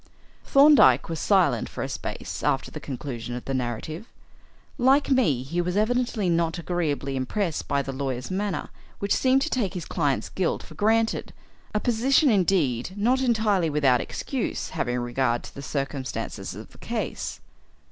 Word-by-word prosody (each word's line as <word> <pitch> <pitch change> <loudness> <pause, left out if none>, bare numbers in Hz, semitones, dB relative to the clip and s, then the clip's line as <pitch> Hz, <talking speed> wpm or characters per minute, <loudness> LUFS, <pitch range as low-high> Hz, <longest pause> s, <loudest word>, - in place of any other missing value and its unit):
Thorndyke 275 - +6
was 165 -1 -3
silent 175 - +2
for - - -5
a - - -2
space - - -5
after 135 -2 0
the 150 - -6
conclusion 125 -4 -5
of 125 - -7
the 135 - -3
narrative. 130 - -3 0.7
Like 270 +3 +4
me, 160 - +3
he 170 +7 -1
was 180 +2 -1
evidently 235 -2 +1
not 165 -1 +1
agreeably 155 -6 -2
impressed 160 +7 -2
by 140 0 +1
the 135 - -4
lawyer's 130 +1 -4
manner, 200 0 -2 0.3
which 200 0 0
seemed 265 +1 +3
to 320 - -2
take 205 -7 -1
his 175 - -4
client's 145 -6 -1
guilt 185 -3 -1
for - - -13
granted, 225 +2 +1 0.4
a - - +3
position 250 +5 +3
indeed 180 - +1
not 245 +6 +2
entirely 215 -8 +2
without 140 -4 +3
excuse - - -3
having 120 0 -2
regard 120 0 0
to - - -10
the 140 - -8
circumstances 140 -1 -4
of - - -10
the - - -18
case. - - -4
170 Hz, 160 wpm, -25 LUFS, 135-215 Hz, 0.7 s, Thorndyke